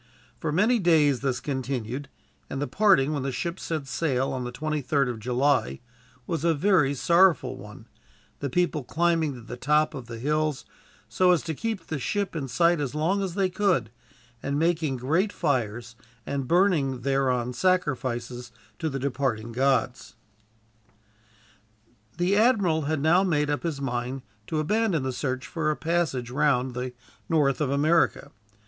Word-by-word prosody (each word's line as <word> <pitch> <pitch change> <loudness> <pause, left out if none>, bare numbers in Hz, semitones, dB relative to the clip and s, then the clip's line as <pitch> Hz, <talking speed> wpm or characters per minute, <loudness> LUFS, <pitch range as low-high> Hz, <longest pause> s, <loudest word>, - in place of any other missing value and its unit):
For 155 - -2
many 215 +9 +3
days 155 - +3
this 130 -3 -1
continued, 130 -1 -4 0.4
and 135 - -4
the 145 - 0
parting, 185 -7 +3
when 145 - -2
the 135 +1 -2
ship 170 +7 -4
set 155 -4 -3
sail 135 -1 -1
on 130 -1 -3
the 120 - -5
23rd 145 0 -1
of 120 -2 -5
July, 125 +5 +1 0.5
was 165 +1 -3
a 165 -1 +3
very 150 -4 +3
sorrowful 170 +2 +3
one, - - -12 0.5
the 140 - -3
people 170 -1 0
climbing 165 0 +1
to 120 - -10
the 120 +2 -8
top 150 +4 +2
of 130 -5 -8
the 115 -1 -7
hills, 150 +3 -1 0.4
so 185 -1 +2
as 175 -3 +3
to 165 -2 -3
keep 220 +5 -4
the 155 - -4
ship 200 +5 -2
in 145 -4 -3
sight 170 +4 +2
as 140 0 -3
long 175 +6 +1
as 185 -3 -3
they 195 -2 +2
could, 180 - 0 0.5
and 140 +1 -2
making 160 -4 +1
great 165 - +1
fires 120 - -2 0.3
and 140 -2 -3
burning 165 -8 +2
thereon 130 -2 0
sacrifices 125 -7 -1 0.3
to 160 - -1
the 135 - -3
departing 130 -4 -2
gods. 130 -1 0 2.0
The 180 +3 +2
admiral 200 - +3
had 155 -3 0
now 170 +5 +4
made 150 -5 +1
up 145 - -1
his 160 -5 -3
mind 125 0 -3 0.2
to 160 - -2
abandon 180 0 +1
the 130 -1 -2
search 130 0 -3
for 160 -2 -2
a 155 - +1
passage 155 -8 -1
round 130 -2 +1
the 125 +1 -4 0.4
north 145 -4 +2
of 145 - +1
America. 155 +4 +2
145 Hz, 160 wpm, -26 LUFS, 130-170 Hz, 2.0 s, now